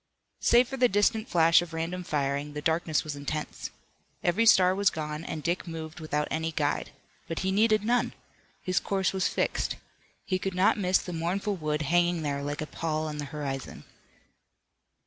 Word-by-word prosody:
Save 240 +1 +5
for 270 - -5
the 250 -1 +4
distant 205 +2 +2
flash 165 0 +5
of 170 -2 -7
random 170 +3 -3
firing, 145 -1 -1
the 150 - -4
darkness 160 -1 +1
was 150 -2 -5
intense. 145 +2 -4 0.5
Every 210 +7 +2
star 185 -4 +6
was 200 +1 +3
gone, 150 0 -5
and 155 -3 -5
Dick 175 +2 -1
moved 160 0 -6
without 150 -1 -1
any 160 +1 -1
guide. 145 -2 -1 0.4
But 165 - -3
he 190 - +1
needed 215 +1 +3
none. 240 +2 +1 0.5
His 185 -1 +1
course 195 -1 0
was 190 -1 +1
fixed. - - -1 0.5
He 185 -1 0
could 190 0 -3
not 190 +3 +3
miss 185 -1 +3
the 180 - -6
mournful 185 +5 -1
wood 155 -3 -2
hanging 175 +2 +2
there 140 -1 -1
like 145 +1 -3
a - - -2
pall 155 0 -2
on 150 -1 -5
the 145 - -3
horizon. 140 -2 -5
165 Hz, 180 wpm, -28 LUFS, 150-190 Hz, 0.5 s, star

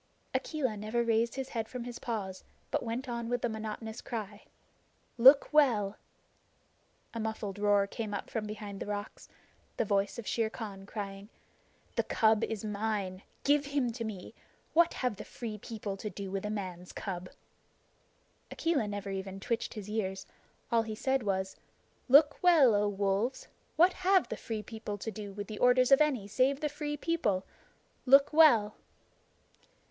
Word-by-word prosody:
Akela 270 -8 -1
never 215 +3 -1
raised 230 0 +1
his 265 0 -4
head 225 -2 -3
from 250 -2 -5
his 240 0 -7
paws, 195 -5 -4 0.3
but - - +1
went 240 +3 -4
on 235 -1 -3
with 245 -1 -1
the 240 - +1
monotonous 220 +1 -5
cry: 215 -3 -6 0.7
"Look 270 +5 +7
well!" 225 -9 +4 1.2
A 230 - -4
muffled 215 -2 -4
roar 205 -1 +4
came 215 +1 -5
up 200 - -4
from 215 -2 -3
behind 210 -2 -7
the - - -5
rocks 205 0 -5 0.5
the - - +1
voice 200 +1 0
of 235 - -6
Shere 225 -2 0
Khan 200 -4 -8
crying: 200 -1 -6 0.7
"The - - +3
cub 220 -1 +3
is 220 -1 -3
mine. 205 -3 -2 0.2
Give 290 0 +4
him 280 -4 0
to 230 0 -5
me. 215 -2 -6 0.4
What 340 +1 +4
have 250 -6 -1
the 210 - -6
Free 220 -3 -7
People 210 -2 -5
to 210 - -5
do 195 0 -6
with 195 +1 -2
a - - -4
man's 185 -4 -5
cub?" 185 -2 -5 1.2
Akela 315 -10 0
never 205 -1 -4
even 195 0 -5
twitched 230 +4 -2
his 210 -2 -7
ears. 190 -3 -3 0.5
All 230 -1 +4
he 220 -1 -5
said 265 +4 0
was: 190 -2 -1 0.5
"Look 290 +2 +6
well, 320 -10 +6
O 205 0 +2
Wolves! 200 +5 -1 0.3
What 355 +3 +5
have 375 0 +4
the - - -3
Free 220 -3 -5
People 220 -2 -6
to 220 +3 -5
do 205 -1 -7
with 205 +1 -6
the 210 +1 -7
orders 250 +1 +4
of 275 - +7
any 265 -10 +1
save 260 +6 +2
the 300 - -1
Free 295 0 -4
People? 245 - 0 0.6
Look 275 +3 +6
well!" 235 -10 +6
220 Hz, 165 wpm, -31 LUFS, 205-250 Hz, 1.2 s, Look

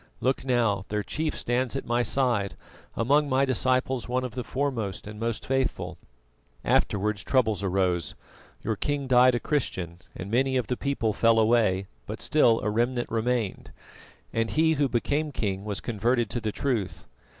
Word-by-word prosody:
Look 130 +1 0
now, 115 -6 +1
their 105 0 -1
chief 155 +8 -2
stands 125 +2 -1
at 135 - -3
my 120 +1 +1
side, 120 -6 0 0.4
among 145 +5 +2
my 135 +1 +3
disciples 130 -1 0
one 130 +1 0
of 125 -3 -4
the 125 - -4
foremost 125 -9 -2
and 105 0 -8
most 115 -1 -2
faithful. 135 -1 -1 0.7
Afterwards 105 0 +1
troubles 110 -7 +2
arose: 90 -3 0 0.5
your 110 - 0
king 145 +5 -1
died 125 -1 +5
a - - 0
Christian, 95 - -2 0.2
and 95 +3 -6
many 130 +2 +2
of 125 - 0
the 125 - -1
people 125 -5 -1
fell 115 +2 +4
away; 110 -4 +3 0.2
but - - -5
still 120 -7 +3
a 105 - 0
remnant 120 +2 0
remained, 115 -2 -1 0.6
and 115 0 0
he 160 +1 +3
who 145 -2 +1
became 145 +6 0
king 100 -6 -2
was 105 -2 -2
converted 120 +1 0
to 120 - -2
the 110 0 -1
truth. 115 -6 -2
120 Hz, 165 wpm, -27 LUFS, 105-130 Hz, 0.7 s, died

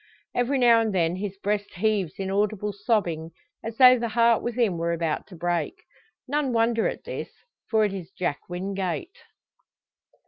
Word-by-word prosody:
Every 245 +3 +1
now 235 -2 +6
and 220 -3 -1
then 170 0 +1
his 195 0 -5
breast 205 +1 -2
heaves 200 -3 0
in 190 -1 -3
audible 210 +1 0
sobbing 180 -6 -1 0.3
as 225 0 -6
though 255 -1 +8
the 235 - -1
heart 230 0 +4
within 235 -7 0
were 170 0 0
about 165 -2 -2
to 190 - -12
break. 175 - -1 0.5
None 280 -1 0
wonder 230 0 +2
at - - -5
this; - - -5 0.4
for 220 -1 +3
it 200 - -2
is 185 -3 -6
Jack 175 -7 -2
Wingate. 190 - -3
205 Hz, 165 wpm, -25 LUFS, 180-230 Hz, 0.5 s, though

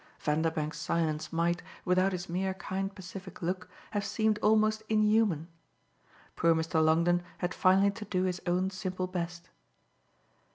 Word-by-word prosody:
Vanderbank's 155 0 -1
silence 155 -2 -1
might, 170 +1 +1 0.2
without 185 +1 +3
his 180 0 -4
mere 190 +2 -1
kind 195 +1 -4
pacific 185 0 -9
look, 185 +2 -2 0.2
have 205 -2 -1
seemed 215 +1 +1
almost 215 0 +3
inhuman. 215 -6 +3 0.9
Poor 165 -1 +4
Mr. 160 0 +1
Longdon 170 +3 +3 0.2
had 180 0 -2
finally 195 +2 +4
to 215 +1 -8
do 185 -2 0
his 180 -1 -1
own 180 +2 +1
simple 185 -1 -3
best. 175 -1 -5
185 Hz, 135 wpm, -30 LUFS, 170-195 Hz, 0.9 s, Poor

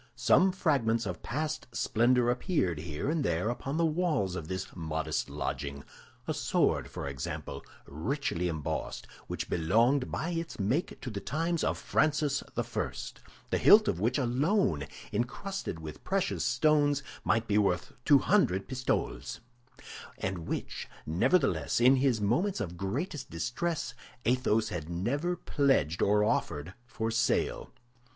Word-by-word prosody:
Some 130 +10 +4
fragments 125 -11 +1
of 90 -3 -4
past 155 +2 -3
splendor 120 +1 +3
appeared 120 - 0
here 75 - -4
and 155 0 +1
there 85 +3 0
upon 135 +4 -4
the 170 - +3
walls 155 - 0
of 80 -4 -5
this 95 +1 -5
modest 80 -2 -2
lodging; 70 +1 -4 0.4
a - - 0
sword, - - +1
for - - -5
example, 70 -2 -5 0.2
richly 90 - -2
embossed, 80 -4 -3 0.2
which - - -4
belonged 115 - +2
by 170 +3 -2
its 165 -5 -4
make 120 - 0
to 125 - -5
the 100 - -4
times 165 +7 -1
of - - +1
Francis 150 -2 +1
I, - - -3 0.6
the - - +2
hilt - - +7
of - - 0
which 115 +6 +1
alone, 130 - +1 0.3
encrusted 120 - -3
with 80 -2 -9
precious 195 0 0
stones, 145 +2 +3 0.2
might 115 0 +1
be 105 0 +3
worth 95 -4 +1
two 145 +1 +7
hundred 130 - +2
pistoles, 125 - -2 0.8
and 95 -3 -3
which, - - -4 0.2
nevertheless, 135 - +2
in 130 +3 +6
his 130 -4 +2
moments 135 - +1
of 90 -4 -4
greatest 130 - -3
distress 125 - -2 0.3
Athos 115 -3 +2
had 85 -5 -5
never 135 - -1
pledged 135 - +1
or 105 +1 +4
offered 85 -6 -1
for 115 -1 -2
sale. 115 +1 0
120 Hz, 140 wpm, -30 LUFS, 90-145 Hz, 0.8 s, hilt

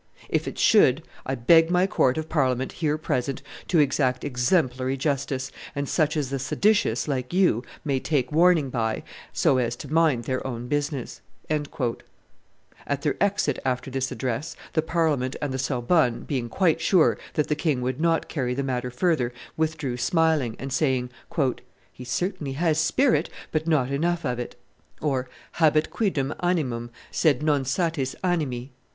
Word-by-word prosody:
If - - 0
it - - -5
should, 160 - +5 0.2
I 135 - 0
beg 165 +7 +5
my 180 +1 +3
court 130 -8 +2
of 160 0 -3
Parliament, 130 -5 0
here 155 -3 -1
present, 135 -3 -2 0.2
to 175 - +2
exact 135 -3 +2
exemplary 130 -1 +1
justice, 135 -1 -1 0.2
and 140 0 -2
such 155 0 +1
as 140 -3 -2
the 135 - -1
seditious, 135 - +1
like 130 0 -2
you, 175 - +3 0.2
may 140 -3 +1
take 130 -3 0
warning 165 -3 +4
by, 110 -3 -1 0.3
so 130 - +3
as 120 -1 0
to 140 +4 -8
mind 160 -7 +3
their 130 +2 -2
own 120 -1 -5
business." 145 -2 -2 0.3
At 140 0 -5
their 145 - +1
exit 200 0 +1
after 130 0 -2
this 135 0 -2
address, 135 +6 -3 0.2
the 160 - +3
Parliament 155 -6 0
and 145 -3 -2
the 130 - -2
Sorbonne, 125 0 +1
being 125 -4 -3
quite 165 -1 +2
sure 165 0 +4 0.2
that 150 - +1
the - - +1
king 150 -4 0
would 130 +3 -2
not 165 -1 +2
carry 125 -5 -2
the 140 - -1
matter 125 -2 -2
further, 125 -2 +1 0.2
withdrew 155 -5 -1
smiling, 160 -6 +1
and 135 0 -5
saying, 130 -4 +1 0.8
"He 125 - -10
certainly 155 +2 -2
has 160 +1 +1
spirit, 245 - +2 0.2
but 155 +1 -1
not 140 -5 +2
enough 170 +4 0
of 125 -2 -1
it" 120 - -5 0.5
(habet 150 +3 0
quidem 155 -10 0
animum, 135 -10 -1 0.2
sed 150 -3 +2
non 145 -3 +2
satis 140 -1 -1
animi). 140 -8 -1
140 Hz, 160 wpm, -25 LUFS, 130-160 Hz, 0.8 s, should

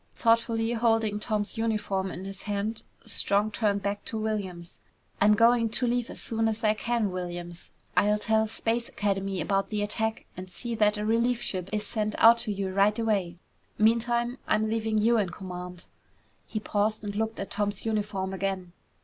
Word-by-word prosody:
Thoughtfully 230 0 +2
holding 225 -2 +2
Tom's 210 0 -2
uniform 205 -4 0
in 180 +1 -7
his 195 0 -7
hand, 210 +2 -2 0.2
Strong 205 0 +2
turned 200 -2 0
back 205 0 -2
to 225 - -3
Williams. 195 -6 -4 0.4
"I'm 210 +1 +6
going 230 +1 +4
to 245 +3 +1
leave 240 0 0
as - - -7
soon 225 0 0
as 225 +1 -2
I 215 -1 +4
can, 225 -2 -1
Williams. 175 -1 -5 0.3
I'll 210 +1 +4
tell 220 +1 +1
Space 230 +2 -1
Academy 195 -2 -1
about 195 +4 0
the 210 -1 -1
attack 220 +2 -1
and 185 +1 -8
see 235 +5 -4
that 210 -1 +3
a 210 - -2
relief 230 +2 +2
ship 185 -4 -3
is 210 0 -1
sent 215 -1 -2
out 230 +1 +7
to 230 -2 -2
you 195 -2 -3
right 200 +2 +3
away. 200 -7 0 0.4
Meantime, 235 +3 +2
I'm 215 0 +2
leaving 220 -1 0
you 225 +2 +4
in 195 -4 0
command." 180 -1 -8 0.6
He 215 - -3
paused 215 +1 0
and 205 -1 -4
looked 220 +1 -2
at 195 - -5
Tom's 205 0 -1
uniform 205 -3 -1
again. 190 -2 -3
210 Hz, 175 wpm, -28 LUFS, 195-225 Hz, 0.6 s, out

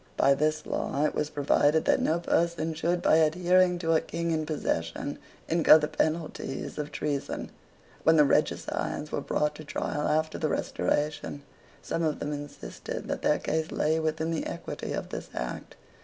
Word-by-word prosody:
By 140 - +5
this 155 +2 0
law 145 +2 -1
it - - 0
was 150 - -1
provided 145 +2 +2
that - - +3
no 165 +2 +2
person 170 -1 0
should, 170 +3 -1
by 155 - +5
adhering 180 +3 +4
to 165 -2 +1
a 160 - +4
King 170 0 -3
in 155 -1 -1
possession, 140 - -2 0.3
incur 160 -1 +7
the 150 -1 -1
penalties 155 -3 -2
of 150 0 -4
treason. 145 -2 -3 0.5
When 160 - +5
the 150 -2 +6
regicides 150 +1 0
were - - -1
brought 150 0 0
to 155 - -8
trial 150 0 -2
after 155 +1 0
the 155 - 0
Restoration, 145 -1 -1 0.4
some 165 - -2
of 155 -3 0
them 150 - -3
insisted 145 0 -7
that - - -2
their - - +3
case 160 +1 -2
lay 155 +1 +1
within 160 +1 -1
the 165 - -2
equity - - -5
of - - -3
this - - -6
act. - - -5
155 Hz, 170 wpm, -28 LUFS, 150-160 Hz, 0.5 s, incur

